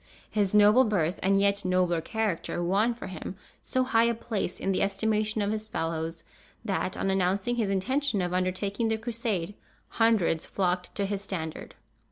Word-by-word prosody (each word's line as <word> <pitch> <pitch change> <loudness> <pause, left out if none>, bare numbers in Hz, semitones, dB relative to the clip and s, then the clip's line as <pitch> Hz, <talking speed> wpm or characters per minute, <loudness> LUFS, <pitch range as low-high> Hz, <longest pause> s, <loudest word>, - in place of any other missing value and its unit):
His 205 -2 +1
noble 210 +5 +7
birth, 185 -7 0
and 195 +1 +3
yet 200 0 +2
nobler 180 -2 +1
character, 200 -3 -2
won 205 +7 +2
for 235 - -8
him 185 0 -6 0.3
so 255 - 0
high 230 -3 +3
a 235 0 +1
place 215 -5 -3
in 195 - 0
the 190 - 0
estimation 215 +1 0
of 200 - 0
his 215 0 -3
fellows, 165 -5 -3 0.4
that, 195 -3 -1
on 195 - 0
announcing 195 +5 +1
his 220 -4 +1
intention 260 +5 0
of 180 -1 -1
undertaking 190 +4 0
the 220 0 +1
Crusade, 220 -5 -2 0.4
hundreds 215 -8 +2
flocked 180 -2 -1
to 200 - 0
his 195 0 -2
standard. 160 -6 -5
200 Hz, 170 wpm, -28 LUFS, 185-220 Hz, 0.4 s, noble